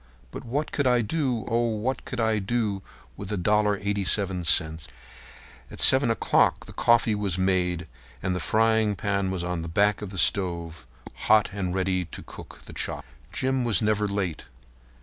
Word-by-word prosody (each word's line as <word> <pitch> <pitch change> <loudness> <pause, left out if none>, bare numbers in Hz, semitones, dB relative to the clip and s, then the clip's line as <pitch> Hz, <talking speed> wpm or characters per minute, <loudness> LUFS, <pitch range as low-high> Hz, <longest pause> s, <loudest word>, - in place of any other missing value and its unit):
But - - -8
what 140 +6 -3
could 145 -3 0
I 125 -1 +3
do—oh! 120 -4 -1
what 125 +5 -3
could 125 - -6
I 110 -1 +1
do 105 -1 -1 0.3
with 100 +1 -8
a 105 - -1
dollar 105 +2 +2
and 100 0 -8
eighty 100 -1 0
seven 95 -1 +1
cents?" 80 -2 +2 0.8
At - - -11
7 130 -2 +6
o'clock 115 - +2
the - - -12
coffee 120 -2 +3
was 100 -4 -2
made 90 -2 0 0.4
and 90 -1 -1
the - - -2
frying 110 +1 +2
pan 100 -1 -1
was 95 -2 -3
on 90 -1 -3
the 85 - -6
back 100 +5 +1
of 105 - -5
the 95 - -9
stove 85 - 0 0.4
hot 110 -1 +5
and 95 -3 -3
ready 95 -1 0
to - - -10
cook - - -12
the - - -11
chops. - - -5 0.2
Jim 130 0 -1
was 115 -6 +1
never 105 -1 +1
late. 100 -5 -3
100 Hz, 180 wpm, -25 LUFS, 90-110 Hz, 0.8 s, 7